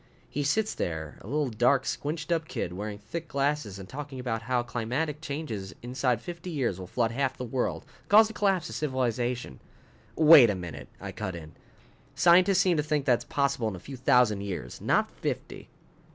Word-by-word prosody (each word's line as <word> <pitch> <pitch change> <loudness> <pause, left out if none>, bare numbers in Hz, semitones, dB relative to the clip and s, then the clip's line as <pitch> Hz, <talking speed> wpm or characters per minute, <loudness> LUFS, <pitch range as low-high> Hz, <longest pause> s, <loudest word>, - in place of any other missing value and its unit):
He 145 - -3
sits 210 +10 +1
there, 80 -3 -4
a - - -12
little, 145 +1 0
dark, 125 +5 +3
squinched 155 +2 -3
up 165 -2 0
kid 90 - -3
wearing 105 +2 -5
thick 165 +11 -6
glasses 140 -7 -1
and 95 -1 -9
talking 140 +1 -7
about 120 -3 -2
how 120 +1 0
climatic 125 +7 -2
changes 140 -11 -5
inside 125 -1 0
fifty 175 0 -7
years 130 - -1
will 90 - -7
flood 115 +3 0
half 130 +1 -1
the - - -5
world, 125 +1 -2 0.2
cause 215 +2 +8
the 220 - -9
collapse 195 -5 +1
of - - -8
civilization 125 - -2 0.3
" 110 +1 -30
"Wait 150 -6 +8
a 105 - 0
minute!" 90 -3 -7
I - - -6
cut 95 -4 -5
in. 80 -2 -9 0.6
"Scientists 180 +5 +5
seem 180 -4 +3
to - - +3
think 150 -2 -1
that's 125 -2 +2
possible 140 -4 0
in 105 - -3
a - - -8
few 135 +9 -9
thousand 125 -5 +3
years. 90 -12 -6
Not - - +2
fifty." - - -5
130 Hz, 190 wpm, -28 LUFS, 110-150 Hz, 0.6 s, cause